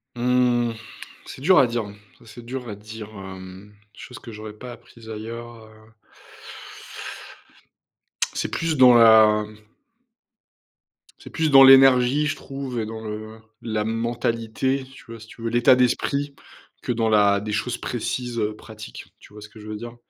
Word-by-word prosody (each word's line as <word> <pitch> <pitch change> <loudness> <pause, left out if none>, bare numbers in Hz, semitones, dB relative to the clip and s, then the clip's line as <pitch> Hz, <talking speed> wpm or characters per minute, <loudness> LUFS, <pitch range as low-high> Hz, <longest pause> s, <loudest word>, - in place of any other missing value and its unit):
Mmh, 120 -1 +1 0.5
c'est - - -10
dur 175 +1 +5
à 130 - +5
dire, 115 -1 -2 0.4
ça, - - -20
c'est 115 +2 -12
dur 125 0 -6
à 105 - -6
dire, 110 +1 -10
hem, 95 -1 -11 0.2
des - - -18
choses 125 - -10
que 115 - -11
j'aurais 110 0 -9
pas 125 +3 -10
apprises 115 -1 -15
ailleurs, 115 +1 -8
heu 110 0 -20 2.4
c'est - - -3
plus 165 -2 -2
dans 125 -1 +7
la 110 -2 +6 1.7
c'est - - -13
plus 160 -3 0
dans 135 -1 +8
l'énergie, 135 +1 +6
je 150 - -2
trouve 135 -3 -6
et 110 - -2
dans 110 0 -7
le 110 +1 -8 0.2
la 110 -2 -2
mentalité, 115 +3 -2
tu - - -15
vois, 115 0 -10
si 110 - -12
tu 115 - -15
veux, 115 - -2
l'état 120 +2 +4
d'esprit 140 +3 0 0.5
que - - -2
dans 115 -1 0
la 100 -2 +4
des 105 +1 -6
choses 120 +3 -2
précises, 120 0 -4
heu, 105 0 -2
pratiques, 110 0 -11
tu - - -18
vois 105 - -12
ce 110 - -11
que 110 - -16
je 105 - -12
veux 110 - -5
dire? 120 +2 -9
115 Hz, 165 wpm, -23 LUFS, 110-125 Hz, 2.4 s, dans